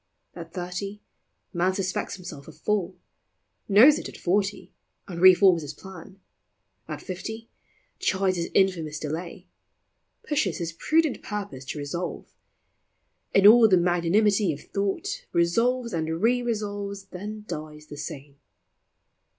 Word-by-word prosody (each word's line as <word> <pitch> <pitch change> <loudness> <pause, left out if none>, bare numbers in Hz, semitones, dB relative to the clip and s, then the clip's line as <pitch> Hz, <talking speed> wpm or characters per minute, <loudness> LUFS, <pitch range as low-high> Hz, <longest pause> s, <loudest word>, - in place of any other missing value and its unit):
At 165 -1 -9
thirty, 185 +3 -5 0.5
man 185 +1 +1
suspects 190 -2 -2
himself 175 -7 -10
a - - -9
fool; 195 +1 -2 0.7
Knows 240 +10 +7
it - - -6
at - - -11
forty, 200 +3 -1 0.3
and 175 -2 -6
reforms 185 -2 +7
his 145 -1 -7
plan; 190 +1 -12 0.7
At - - -6
fifty, 220 +5 -7 0.5
chides 190 -1 +1
his 170 - -2
infamous 170 -6 +2
delay, 170 +4 -5 0.8
Pushes 295 0 0
his 170 -2 -4
prudent 315 - +1
purpose 200 -11 -6
to 145 - -5
resolve; 150 +5 -5 1.0
In 195 - +5
all 225 +2 +9
the 185 - +5
magnanimity 180 +3 +2
of 145 - -7
thought, 200 -1 -2
Resolves, 235 +8 +1
and 160 0 -2
re 245 +5 +2
resolves; 205 -4 -3
then 210 +3 -7
dies 150 0 -7
the 150 - -10
same. 140 -1 -8
185 Hz, 125 wpm, -26 LUFS, 170-210 Hz, 1.0 s, all